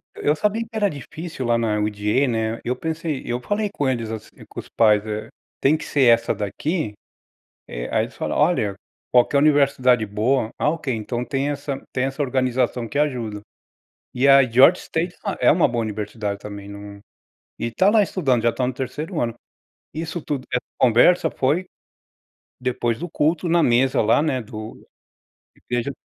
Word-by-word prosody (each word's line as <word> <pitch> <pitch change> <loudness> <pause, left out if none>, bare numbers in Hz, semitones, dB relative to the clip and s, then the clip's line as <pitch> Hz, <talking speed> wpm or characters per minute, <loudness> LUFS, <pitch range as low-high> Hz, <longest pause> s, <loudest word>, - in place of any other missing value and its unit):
Eu 150 +1 +1
sabia 210 +6 0
que 225 - -6
era 210 -2 +1
difícil 155 -1 -7
lá 120 0 +3
na 110 -2 0
UGA, 105 +5 +1
né, 115 -1 -1
eu 125 - -1
pensei 160 0 -3
eu 120 +1 -2
falei 205 - -1
com 140 -2 0
eles, 115 -3 -2
assim, 110 0 -7 0.2
com - - -8
os - - -9
pais, 105 -2 +3
eh: 105 0 -4 0.3
"Tem 145 +3 +4
que 160 - -5
ser 140 - +1
essa 115 -2 +4
daqui?" 105 - -2 0.8
Eh, - - -5
aí - - +2
eles - - -11
falam: - - -3
"Olha, 100 -2 +2 0.3
qualquer 125 +3 +4
universidade 140 -6 +3
boa." 110 +3 0
Ah 150 - +1
ok, 155 -5 -3
então 120 +3 -3
tem 140 +2 -1
essa 140 -1 -4
tem 125 - 0
essa 135 +2 -2
organização 125 -2 0
que 145 - -8
ajuda. 120 -8 -1 0.7
E 130 +2 +2
a 135 0 +8
Georgia 130 +8 +5
State 170 +2 -2 0.3
é - - +5
uma 165 +1 +4
boa 120 -3 -1
universidade 105 -1 -4
também 100 -1 -8
num 100 0 -10 0.6
e 115 - -2
tá 190 - +3
lá 215 0 +5
estudando, 135 - 0
já 115 - +3
está 125 - -2
no 130 - -1
terceiro 150 +7 -4
ano. 115 -1 -1 0.6
Isso 165 +2 -4
tudo, 135 -3 -4
essa 125 - 0 0.2
conversa 130 +7 +4
foi 150 +8 0 1.0
depois 120 -2 -1
do 175 +1 -6
culto, 160 +4 0
na 170 0 +4
mesa 130 +2 +3
lá, 115 +6 +3
né, 135 -5 0
do 110 0 -9 0.7
igreja 120 +2 -3
130 Hz, 175 wpm, -22 LUFS, 115-150 Hz, 1.0 s, a